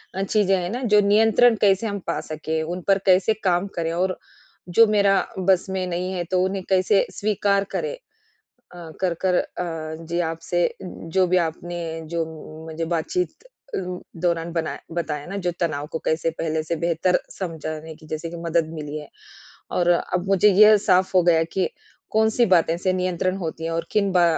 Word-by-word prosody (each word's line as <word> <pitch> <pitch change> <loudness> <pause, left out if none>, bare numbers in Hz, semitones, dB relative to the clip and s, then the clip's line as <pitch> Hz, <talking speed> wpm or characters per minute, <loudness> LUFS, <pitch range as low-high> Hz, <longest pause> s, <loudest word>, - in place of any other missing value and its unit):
अ, 190 - -1
चीज़ें 195 -1 +2
हैं 175 -1 -2
न 260 - -5
जो 210 0 +5
नियंत्रण 225 +3 +5
कैसे 200 +2 +3
हम 200 -1 -3
पा - - -1
सकें 160 +1 -2
उन 175 +3 -4
पर 195 - +5
कैसे 190 +3 +4
काम 180 0 +2
करें 165 -1 -1
और 185 +2 0 0.6
जो 230 - +9
मेरा 200 -2 +4 0.2
बस 185 -1 +3
में 190 -1 -2
नहीं 180 +1 -2
है 180 -2 -2
तो 185 -1 +3
उन्हें 190 0 -2
कैसे 190 +1 +3
स्वीकार 200 -1 +1
करें। 475 +1 -2 0.8
अ, 170 -2 -10
कर-कर 180 0 +1
अ, 160 -3 -4
जी 170 +2 -2
आपसे 165 +1 -1 0.2
उम्म, 175 -2 -9
जो 185 +3 +3
भी 185 +1 +3
आपने 175 +2 -5 0.3
जो 170 -1 -1 0.4
मुझे 160 +1 -4
बातचीत 170 - -1 0.5
अ, - - -1 0.5
दौरान 170 -1 0
बनाया 165 -2 -2 0.2
बताया 150 -4 -3
न 200 - -3
जो 175 - +2
तनाव 150 -4 -1
को 160 - -3
कैसे 160 +1 +1
पहले 160 -1 -1
से 165 +2 -2
बेहतर 170 +2 +2 0.2
समझाने 160 -3 -5
की 155 - -16
जैसे 155 +2 -4
कि 170 - -8
मदद 165 -1 +1
मिली 150 -1 -5
है। 150 - -11 0.6
और 175 -1 +1
अब 175 +1 0
मुझे 195 +1 +5
यह 215 +2 +7
साफ़ 185 +1 +4
हो 180 - +6
गया 165 -2 +4
कि 190 -2 +1 0.4
कौन-सी 220 +2 +3
बातें 165 -2 +4
से 185 +1 0
नियंत्रण 185 0 -1
होती 165 -2 -5
है 165 - -2
और 165 0 -2
किन 200 -2 +2
बा 180 -1 +5
180 Hz, 185 wpm, -23 LUFS, 165-195 Hz, 0.8 s, जो